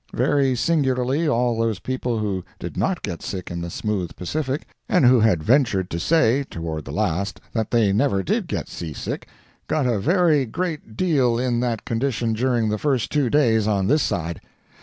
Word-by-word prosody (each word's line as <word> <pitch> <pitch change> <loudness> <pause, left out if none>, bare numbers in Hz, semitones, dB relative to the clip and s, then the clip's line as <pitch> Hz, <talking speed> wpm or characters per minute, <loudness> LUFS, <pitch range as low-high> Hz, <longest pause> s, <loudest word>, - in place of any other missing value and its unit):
Very 135 -3 +2
singularly, 135 +1 +1
all 120 -4 +2
those 115 -3 +1
people 125 +1 -2
who 100 -4 -2
did - - -7
not - - -1
get 85 - -4
sick 95 -3 -5
in 85 0 -4
the 85 - -4
smooth 100 -1 -3
Pacific, 140 - -3 0.2
and 180 -8 +4
who 125 0 +6
had 105 -8 +3
ventured 110 - +2
to 85 - -2
say, 140 - +3
toward 80 - -5
the - - -7
last, 100 +5 -1
that 110 -3 -1
they 110 -5 +3
never 100 -3 +1
did - - -1
get - - -3
sea 80 -3 -6
sick, - - -5 0.4
got 150 -4 0
a 120 -4 +1
very 155 - +3
great 155 -5 -4
deal 135 -10 +2
in 120 -1 0
that 120 -3 -2
condition 115 -1 -1
during 120 0 +1
the 105 0 -1
first 135 -6 0
two 145 -5 +1
days 115 -7 +3
on 100 -3 +1
this 150 +8 +3
side. 85 -7 -2
120 Hz, 185 wpm, -23 LUFS, 100-140 Hz, 0.4 s, who